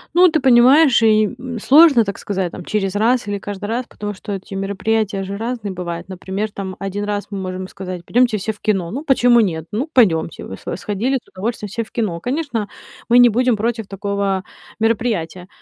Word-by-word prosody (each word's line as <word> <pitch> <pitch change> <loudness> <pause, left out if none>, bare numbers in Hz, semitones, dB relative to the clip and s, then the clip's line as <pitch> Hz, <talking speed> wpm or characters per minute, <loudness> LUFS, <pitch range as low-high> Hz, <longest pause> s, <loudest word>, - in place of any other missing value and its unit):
Ну, 365 +1 +7
ты 315 -1 +1
понимаешь, 260 +1 +6
и, 215 -2 +3
м, 245 -3 -6
сложно, 280 -2 +6
так 200 -1 -5
сказать 190 -3 -3
там, 180 - -9
через 200 -2 -1
раз 230 +1 +2
или 205 0 -2
каждый 205 0 -6
раз, 235 +4 -2
потому 205 0 -6
эти 195 -1 -5
мероприятия 200 +1 -1
же 200 +1 -5
разные 225 -3 -4
бывают. 175 0 -6
Например, 190 +3 -4
там, 190 -2 -6
один 195 +1 -4
раз 205 0 -3
мы 200 - -4
можем 185 0 -5
сказать: 185 -3 -7
"Пойдемте 240 -3 +2
все 210 +3 -2
в 210 - -14
кино". 190 -5 0
Ну, 275 +8 -4
почему 245 -4 +4
нет? 165 -7 0
Ну, 245 +9 -2
пойдемте, 170 -10 +2
вы 95 - -8
схо - - -5
сходили 220 +7 -1
с - - -37
удовольствием 210 +2 -4
все 230 +3 -3
в - - -18
кино. 205 -8 -2
Конечно, 250 - -2 0.4
мы 245 - +6
не 245 -1 +8
будем 245 +1 +2
против 225 0 -2
такого 200 -1 -2 0.4
мероприятия. 215 -6 -1
210 Hz, 195 wpm, -19 LUFS, 195-240 Hz, 0.4 s, не